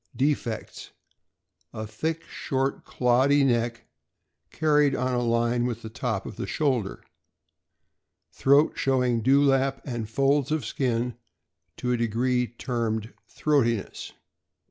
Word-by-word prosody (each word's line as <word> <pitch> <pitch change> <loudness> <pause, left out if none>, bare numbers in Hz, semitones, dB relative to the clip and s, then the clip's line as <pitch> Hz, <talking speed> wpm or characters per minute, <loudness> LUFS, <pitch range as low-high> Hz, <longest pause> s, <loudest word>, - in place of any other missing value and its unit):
Defects: 130 -4 -2 0.8
A 110 - -5
thick, 160 +9 -3
short, 135 0 -2
cloddy 130 +4 +3
neck, 120 -3 0 0.6
carried 150 -3 +2
on 125 +1 -1
a 120 - +1
line 120 +1 +1
with 115 -1 -5
the 110 - -7
top 110 - -3
of - - -8
the - - -4
shoulder. 130 -10 -1 1.3
Throat 140 +3 +3
showing 125 -3 +1
dewlap 135 +1 +3
and 120 -5 -4
folds 135 +3 +2
of 155 -6 0
skin 120 -1 -1 0.6
to 125 - -2
a 125 - +2
degree 120 +2 +1
termed 115 -2 -3
"throatiness." 120 -8 -1
125 Hz, 115 wpm, -26 LUFS, 115-135 Hz, 1.3 s, cloddy